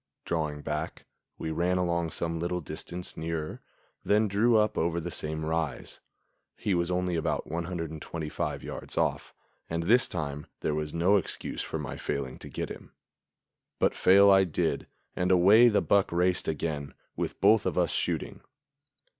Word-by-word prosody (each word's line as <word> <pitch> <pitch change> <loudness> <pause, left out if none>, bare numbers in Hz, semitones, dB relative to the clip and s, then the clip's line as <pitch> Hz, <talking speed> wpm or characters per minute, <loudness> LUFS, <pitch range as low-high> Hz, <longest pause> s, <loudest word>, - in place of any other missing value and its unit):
Drawing 75 -3 -2
back, - - -4 0.3
we 80 - -4
ran 90 +3 +1
along 85 -2 0
some 85 0 -2
little 90 +1 -1
distance 85 +3 -6
nearer, 80 -1 -4 0.4
then 105 +1 +3
drew 110 +4 +3
up 105 0 +2
over 85 +1 0
the 85 +1 -5
same 80 0 -3
rise. 80 -2 -3 0.6
He 100 - -1
was 85 -1 +1
only 90 -1 0
about 80 - -1
125 80 -2 -4
yards - - -6
off, - - 0 0.4
and 85 0 -1
this 115 +8 +4
time 75 -3 -4
there 75 - 0
was 75 0 -2
no 90 +6 +3
excuse 95 - -3
for - - -4
my - - -5
failing 70 -2 -4
to - - -9
get - - -4
him; - - -10 0.8
but - - +2
fail 100 +2 +6
I 95 0 +6
did, 90 -5 -1 0.3
and 90 0 0
away 100 +7 +7
the 105 -3 +2
buck 100 -1 +3
raced 90 +1 +1
again, 75 -2 -3 0.2
with - - -3
both 105 +2 +5
of - - -2
us 90 -2 +2
shooting. - - -2
85 Hz, 160 wpm, -29 LUFS, 80-95 Hz, 0.8 s, away